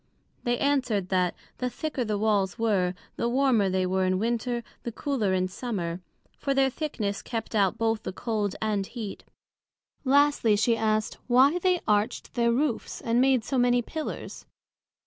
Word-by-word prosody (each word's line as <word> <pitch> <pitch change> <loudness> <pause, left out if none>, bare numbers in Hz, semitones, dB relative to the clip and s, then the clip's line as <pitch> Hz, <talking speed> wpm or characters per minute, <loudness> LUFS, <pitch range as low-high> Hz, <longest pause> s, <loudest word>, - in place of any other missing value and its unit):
They 240 0 +1
answered, 250 -10 +1
That, 180 -2 +1 0.2
the 250 - 0
thicker 295 0 -3
the 210 -2 -1
Walls 200 -3 +1
were, 195 -5 +1 0.2
the 235 - 0
warmer 245 -6 +3
they 185 0 +1
were 190 +1 +1
in 185 0 +2
Winter, 235 +3 -1 0.2
the 235 - -4
cooler 230 -5 -1
in 185 0 +1
Summer; 185 -4 -4 0.4
for 275 -1 0
their 270 -1 +3
thickness 220 -10 -3
kept 225 -2 -5
out 200 -4 +2
both 225 -1 0
the - - -4
Cold 210 -1 -2
and 205 -3 0
Heat. 220 -5 -7 0.8
Lastly, 280 -5 +4
she 230 +3 +3
asked, 215 -1 0
Why 265 +7 +5
they 365 -1 +2
Arched 210 0 0
their 235 -1 +2
Roofs, 255 0 -1
and 230 +2 +2
made 260 -3 +3
so 265 +2 -1
many 245 0 +3
Pillars? 315 +6 -6
230 Hz, 165 wpm, -27 LUFS, 200-255 Hz, 0.8 s, Why